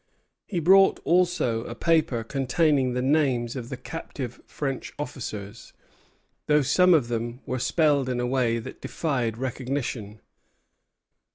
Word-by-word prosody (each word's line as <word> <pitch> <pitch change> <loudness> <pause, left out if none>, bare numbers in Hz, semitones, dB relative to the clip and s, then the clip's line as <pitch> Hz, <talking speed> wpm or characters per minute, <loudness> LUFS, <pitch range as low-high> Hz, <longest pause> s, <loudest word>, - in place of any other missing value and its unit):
He 185 - -4
brought 195 +4 +5
also 170 -10 +2
a - - -6
paper 155 -8 +1
containing 135 +1 +1
the 125 0 -1
names 130 -4 +1
of 125 -2 -6
the 130 - -5
captive 130 -5 -7
French 135 -3 -4
officers, 110 -7 -7 0.7
though 150 -1 +4
some 180 +6 +5
of 140 -7 +2
them 120 +2 -3
were 130 0 -2
spelled 145 -1 +2
in 125 -1 -1
a 125 - 0
way 125 -2 +1
that 115 - -8
defied 125 -8 -2
recognition. 125 -4 -4
130 Hz, 130 wpm, -26 LUFS, 120-150 Hz, 0.7 s, brought